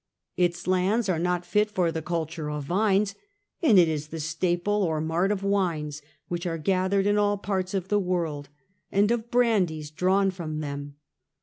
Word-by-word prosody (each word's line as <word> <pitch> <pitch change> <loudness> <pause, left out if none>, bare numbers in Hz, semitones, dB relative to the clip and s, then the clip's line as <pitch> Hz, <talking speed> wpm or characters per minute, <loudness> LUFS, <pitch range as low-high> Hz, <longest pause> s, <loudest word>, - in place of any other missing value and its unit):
Its 175 -1 0
lands 190 +5 +1
are 170 -4 +1
not 180 0 0
fit 210 0 +2
for 180 -5 +1
the 160 - -3
culture 160 -1 -3
of 150 -1 -3
vines, 200 +4 +1 0.5
and 255 - +5
it 175 -2 +7
is 155 -1 -2
the 160 +1 -6
staple 175 +6 0
or 160 -5 0
mart 165 +5 0
of 200 -2 -2
wines, 165 -7 -1 0.3
which 175 +1 -3
are 165 -1 -2
gathered 190 +4 +1
in 205 0 +3
all 205 0 +2
parts 190 -1 -2
of 190 -1 -2
the 205 - +3
world, 165 -7 -2 0.4
and 205 +3 +3
of 235 -1 -1
brandies 185 -12 +1
drawn 190 +4 +2
from 160 -4 -5
them. 145 -1 -5
180 Hz, 180 wpm, -26 LUFS, 160-200 Hz, 0.5 s, it